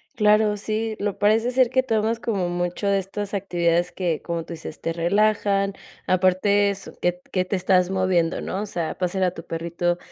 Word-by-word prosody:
Claro, 210 0 +3
sí, 215 +1 -2
lo 205 -1 -2
parece 220 +4 +3
ser 255 -1 +3
que 260 0 +3
tomas 225 -2 0
como 195 -7 -1
mucho 175 +3 -2
de 200 -1 +3
estas 200 +2 -5
actividades 175 -2 0
que, 175 -4 -1
como 170 -1 -3
tú 170 - -12
dices, 160 -1 -9
te 165 - -1
relajan, 200 +3 +1 0.3
aparte 190 +2 +3
es 195 - -8
que 175 0 +2
t 180 - -21
que 185 -1 +1
te 195 - -1
estás 185 0 +2
moviendo 185 -3 +1
¿no? 195 - -3
O - - -2
sea, 170 -5 -4
pasear 185 +1 -1
a 180 - +2
tu 165 - -9
perrito, 170 +1 -2
190 Hz, 195 wpm, -23 LUFS, 175-210 Hz, 0.3 s, Claro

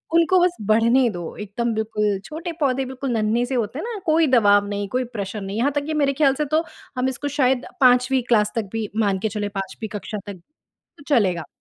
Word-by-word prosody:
उनको 335 +2 +4
बस 355 0 +2
बढ़ने 230 +3 +4
दो। 175 -4 -7
एकदम 225 +3 -2
बिल्कुल 210 -2 0
छोटे 330 +3 -5
पौधे, 265 -1 +1
बिल्कुल 260 0 -4
नन्हे-से 235 +3 0
होते 235 +3 -2
हैं - - -4
ना, 460 -4 -5
कोई 320 -1 +3
दबाव 205 -5 +4
नहीं, 205 0 -3
कोई 255 +2 0
प्रेशर 200 0 -4
नहीं। 195 +2 -5
यहाँ 270 +5 +2
तक 285 0 -1
कि 315 - -3
मेरे 275 0 +2
ख्याल 275 -1 +3
से 300 - -1
तो 325 - +3 0.3
हम 255 +1 +1
इसको 270 +2 -4
शायद 255 -1 +2 0.2
5वीं 250 +1 +4
क्लास 210 -3 +3
तक 215 -4 -2
भी 225 -2 -2 0.2
मान 195 -1 +1
के - - +2
चलें, 205 -1 -2
5वीं 195 +3 -5
कक्षा 210 - -6
तक, 190 -4 -8 0.6
तो 285 - -14
चलेगा। 185 -8 +1
240 Hz, 210 wpm, -22 LUFS, 210-270 Hz, 0.6 s, उनको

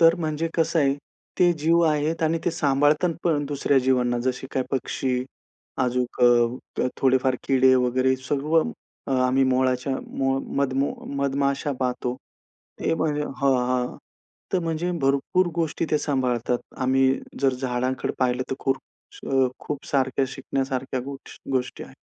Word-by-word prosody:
तर 165 0 +7
म्हणजे 160 -1 -2
कसं 165 0 +1
आहे, 140 -2 +3 0.4
ते 175 -1 +5
जीव 165 +3 +3
आहेत 155 +2 0
आणि 160 +1 +2
ते - - +2
सांभाळतात 150 +2 +2
पण 155 -4 +2
दुसऱ्या 140 -1 +2
जीवांना. 125 -2 +2
जसे 130 +1 -2
काही 130 -1 -1
पक्षी, 130 -1 -1 0.6
अजून 125 0 -1 0.8
थोडेफार 130 -1 +3
किडे 130 -1 +5
वगैरे, 130 +1 +2
सर्व 145 +5 +1 0.6
आम्ही 135 +1 +3
मोहळाच्या 130 0 +1 0.6
मधमो 140 0 +1 0.2
मधमाशा 140 +1 0
पाहतो. 125 -1 -1 0.7
ते - - +1
म्हणजे 150 -2 0
हां, 140 -1 0 0.2
हां, 125 -1 -1 0.6
तर 185 - +3
म्हणजे 165 +2 -1
भरपूर 140 +7 +2
गोष्टी 165 -1 -1
ते 155 - +4
सांभाळतात. 125 -4 0 0.2
आम्ही 130 0 +3 0.3
जर 135 -1 +3
झाडांकडे 130 0 -2
पाहिले 125 0 +1
तर - - 0
खूप 135 0 0 0.5
अ, 135 -1 +4
खूप 145 -2 -5
सारख्या 135 -1 +1
शिकण्यासारख्या 130 -1 -3
गोष 135 +1 -9
गोष्टी 130 -1 -2
आहेत. - - -14
135 Hz, 135 wpm, -24 LUFS, 130-150 Hz, 0.8 s, तर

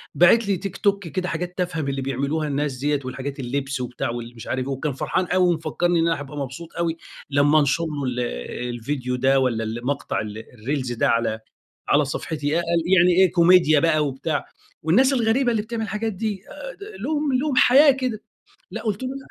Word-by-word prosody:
باعت 200 +6 +5
لي 200 -2 +1
تيك 195 +1 -6
توك 200 -3 +1
كده 180 +2 -3
حاجات 180 +2 -4
تافهة 180 -3 -1
من 140 - -3
اللي 135 0 -2
بيعملوها 140 +4 -1
الناس 145 -2 -2
ديَّة، 145 +2 0
والحاجات 135 +2 -5
اللبس 135 +1 -3
وبتاع 125 -1 -3
والمش 120 -1 -7
عارف 130 -1 -2
إيه - - -2
وكان 135 +2 -3
فرحان 185 +7 -1
أوي 180 +1 +2
ومفكّرني 170 +2 0
أنا 165 +1 +2
راح 155 - -1
أبقى 145 +1 -8
مبسوط 145 +5 -6
أوي 165 -1 -1 0.3
لمّا 145 +2 +4
أنشر 145 +3 +1
له 150 -3 -4
ال 125 -1 -2 0.5
الفيديو 125 +2 -3
ده 135 +2 +3
والَّا 120 -4 0
المقطع 120 +5 -2
ال 105 0 -6 0.2
الريلز 130 +2 -3
ده، 120 - +1
على، 115 -1 +1 0.5
على 145 0 +4
صفحتي 145 +1 -4
يا 150 - +1 0.4
يعني 180 +1 +6
إيه 185 -1 +5
كوميديا 170 -3 +5
بقى 155 -1 +2
وبتاع، 140 +2 -2 0.4
والناس 255 - +4
الغريبة 240 +1 +2
اللي 220 -2 +1
بتعمل 225 +1 -4
الحاجات 220 0 -2
دي 205 -1 -3 0.6
ل - - -8
لهم 295 -2 0
لهم 270 +2 0
حياة 280 +4 +7
كده، 255 -5 -3 0.5
لأ - - -5
قلت 215 +1 -2
له 255 - -2
لأ 270 - -6
155 Hz, 195 wpm, -23 LUFS, 135-190 Hz, 0.6 s, حياة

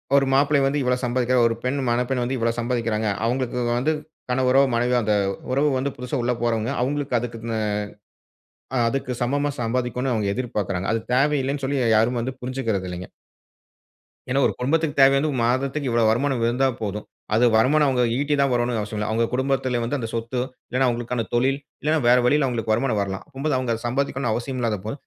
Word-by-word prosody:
ஒரு 140 -1 +5
மாப்பிள்ளை 140 +1 +4
வந்து 140 +2 +1
இவ்வளோ 125 0 +1
சம்பாதிக்கிறார், 125 0 +2
ஒரு 115 - -1
பெண் 130 +3 -1
மணப்பெண் 125 +2 0
வந்து 130 +2 -2
இவ்வளோ 115 0 +1
சம்பாதிக்கிறாங்க, 115 -3 -1 0.2
அவங்களுக்கு 125 +1 -1 0.2
வந்து 150 +6 +1 0.4
கனவரோ, 130 +1 +3
மனைவியோ 120 +1 +2
அந்த 105 - +1 0.4
உறவு 140 +3 +2
வந்து 135 +2 -1
புதுசா 125 +2 -3
உள்ள 125 0 +1
போறவங்க, 115 +1 0
அவங்களுக்கு 140 -1 0
அதுக்குன்னு 115 -1 -4 1.2
ஆ - - +2
அதுக்கு 135 0 -3
சமமா 145 +4 +1
சம்பாதிக்கனுன்னு 125 +2 -1
அவங்க 105 -3 0
எதிர்பார்க்கிறாங்க. 100 -7 -2
அது 115 - +1
தேவையில்லைனு 140 +1 +1
சொல்லி 140 +1 0 0.2
யாரும் 115 +3 +2
வந்து 130 +3 -2
புரிஞ்சிக்கிறது 125 -7 -2
இல்லைங்க. 90 0 -6 1.2
ஏன்னா, 135 - +2
1 - - +1
குடும்பத்துக்கு 145 +3 0
தேவை 135 0 +7
வந்து 150 +2 +1
1 130 - -2
மாதத்துக்கு 135 +2 -1
இவ்வளோ 115 -1 +2
வருமானம் 130 0 0
இருந்தா 125 +3 +2
போதும். 105 0 -4 0.3
அது 120 +2 +4
வருமானம் 145 +6 +4
அவுங்க 125 -2 +2 0.2
ஈட்டி 145 +1 0
தான் 140 -1 +3
வரனுன்னு 120 -1 0
அவசியம் 105 0 -5
இல்ல. 105 - -2
அவுங்க 115 +1 +2
குடும்பத்தில 130 -1 0
வந்து, 140 +5 -1
அந்த 115 - -3
சொத்தோ, 115 +2 -2 0.3
இல்லைன்னா 130 +1 +2
அவுங்களுக்கான 120 -1 -2
தொழில், 135 +3 +2 0.2
இல்லன்னா 155 +2 +2
வேற 125 +1 +6
வழியில 140 +2 +3
அவுங்களுக்கு 115 -3 -1
வருமானம் 120 -2 0
வரலாம். 95 -1 -4
அப்பம்போது, 145 -1 -2
அவுங்க 125 -2 -1
அத 115 - -9
சம்பாதிக்கனும்ன்னு 135 -2 -1
அவசியம் 130 +1 -4
இல்லாதப்போ, 110 -1 -2
125 Hz, 180 wpm, -23 LUFS, 115-135 Hz, 1.2 s, தேவை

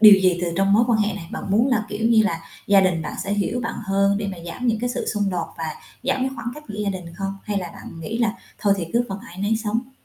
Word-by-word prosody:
điều 215 -2 +11
gì 185 -2 +3
từ - - +1
trong 195 0 +3
mối 220 +3 +6
quan 235 -3 +3
hệ 210 0 +2
này? 170 -4 -7
Bạn - - -4
muốn 220 +5 +4
là, 230 -5 +2
kiểu 215 +2 0
như 225 -2 +6
là, 170 -6 0 0.3
gia 200 -1 +7
đình 185 -4 +2
bạn - - -4
sẽ 200 - -1
hiểu 205 +4 0
bạn 230 -1 -3
hơn 200 0 +3
để 210 - -2
mà 190 - -5
giảm 245 +9 -4
những 225 -2 +2
cái 245 0 0
sự - - -3
xung 205 -3 0
đột 175 -3 -1
và 165 - -2 0.4
giảm 265 +1 +1
cái 265 - +1
khoảng 230 -2 -4
cách 300 0 -10
giữa 210 0 -6
gia 200 - +1
đình 180 -3 -6
không? 195 +1 -3
Hay 205 -1 0
là 180 -2 -4
bạn 165 - -10
nghĩ 220 +8 -3
là 230 -3 +2 0.3
thôi 200 -1 +3
thì 175 -4 -3
cứ 240 +1 +3
phần 195 - -4
ai 175 - -11
nấy 205 +3 +2
sống? 230 +4 -1
205 Hz, 300 wpm, -23 LUFS, 195-230 Hz, 0.4 s, điều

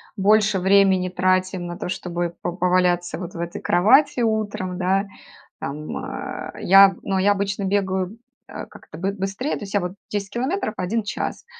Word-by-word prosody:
больше 210 0 +3
времени 190 -1 +4
тратим 185 0 0
на 175 0 -6
то, - - -5
чтобы 175 -1 -3
по - - -3
поваляться 180 -1 +1
вот 180 0 -7
в - - -8
этой 170 0 -5
кровати 245 +9 +4
утром, 210 -5 -1
да. 190 +2 +1 0.5
Там, 150 +2 -5
э, - - -6
я, 195 0 +7
ну, 195 -1 -1
я 195 +2 +3
обычно 200 0 -1
бегаю, 190 +1 -1 0.3
э, - - -8
как-то 155 - -13
бы 190 +3 -1
быстрее, 195 +8 -3
то - - -8
есть 200 -1 -7
я, 205 - +3
вот, 180 -1 -4 0.2
10 200 -1 -3
километров 255 - -2
1 210 +6 -1
час. 205 - -4
190 Hz, 170 wpm, -22 LUFS, 180-205 Hz, 0.5 s, я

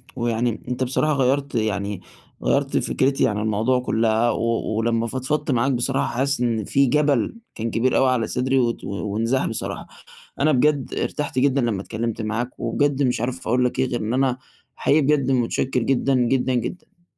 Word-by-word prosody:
ويعني 120 -2 -1
أنت 125 +1 -1
بصراحة 145 +4 +1
غيّرت 135 0 0
يعني 100 -3 -1 0.4
غيّرت - - +1
فكرتي 135 +1 +1
عن 105 -2 -1
الموضوع 110 +4 +1
كلَّها، 115 -1 +1
و 115 -1 -1
ولمَّا 115 0 +1
فضفضت 130 +5 -2
معاك 130 +2 +2
بصراحة 135 +2 0
حاسس 140 0 0
إن 115 -4 0
في 140 +6 +3
جبل 145 - +1 0.2
كان 115 +1 -3
كبير 125 +2 +1
أوي 135 - +4
على 125 -3 +1
صدري، 130 +1 +1
وات 120 -2 0
وانزاح 110 +6 -1
بصراحة، 115 - -4 0.5
أنا 155 +2 +4
بجد 145 0 +1
ارتحت 145 -3 -2
جدًا 140 +1 +3
لما 115 -6 -1
اتكلمت 115 +2 -3
معاك، 115 +3 -3
وبجد 140 +4 +1
مش 125 -4 +1
عارف 125 +2 -3
أقول 125 +2 +2
لك 125 - -1
إيه 130 - +2
غير 120 -1 -3
إن 110 +3 -2
أنا 130 -1 +1 0.4
حقيقي 150 - +3
بجد 140 -2 +2
متشكِّر 130 +1 0
جدًا، 135 +2 +1
جدًا، 130 +1 +1
جدًا. 175 - -5
125 Hz, 170 wpm, -22 LUFS, 115-135 Hz, 0.5 s, أوي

